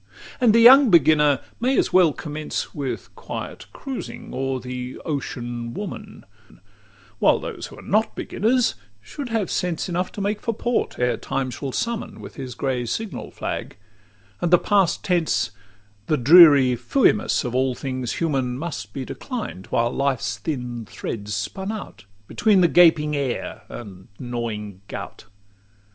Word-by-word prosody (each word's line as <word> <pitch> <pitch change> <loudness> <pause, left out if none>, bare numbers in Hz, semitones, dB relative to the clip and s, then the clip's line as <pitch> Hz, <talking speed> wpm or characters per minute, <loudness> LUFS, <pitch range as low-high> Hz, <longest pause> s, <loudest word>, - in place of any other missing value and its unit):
XL 250 - +1
And 220 -2 +6
young 250 +3 +8
beginners 150 -5 +5 0.2
may 255 +3 +1
as - - +1
well 180 -4 +6
commence 150 +1 -5
With 140 -3 -5
quiet - - -7
cruising 270 -3 -7
o'er 135 0 -2
the 125 0 -6
ocean 120 -5 -4
woman; 210 +1 -7 0.9
While - - +4
those - - -6
who - - -13
are - - -12
not 215 +3 +1
beginners 245 +3 +1 0.3
should 240 - -7
have 225 -4 -1
sense 180 -2 -1
Enough 180 +1 -1
to - - -7
make 205 +1 -1
for 230 - -2
port, 240 +2 -1
ere 125 -2 +1
time 135 -1 -3
shall 135 +2 -5
summon 230 - -3
With - - -10
his 130 -3 -7
grey 125 -3 -2
signal 220 - -4
flag; - - -5 0.6
and 175 - +1
the 175 - +7
past 195 -1 +2
tense, 175 -4 +1 0.6
The 155 - +2
dreary 140 -2 +8
"Fuimus" 125 - +2
of 125 - -3
all 130 0 +1
things 130 -3 -3
human, 135 -6 -1
Must 120 -10 -6
be 130 - -4
declined, 215 - -6
while 120 +1 +1
life's 125 -7 -1
thin 125 -6 -4
thread's 105 -2 -5
spun 190 - -4
out 215 - -8 0.2
Between 210 -4 +3
the 175 - +6
gaping 160 -3 +5
heir 130 -4 -3
and 95 -6 -10
gnawing 110 -5 -5
gout. - - -8
145 Hz, 150 wpm, -23 LUFS, 125-195 Hz, 0.9 s, young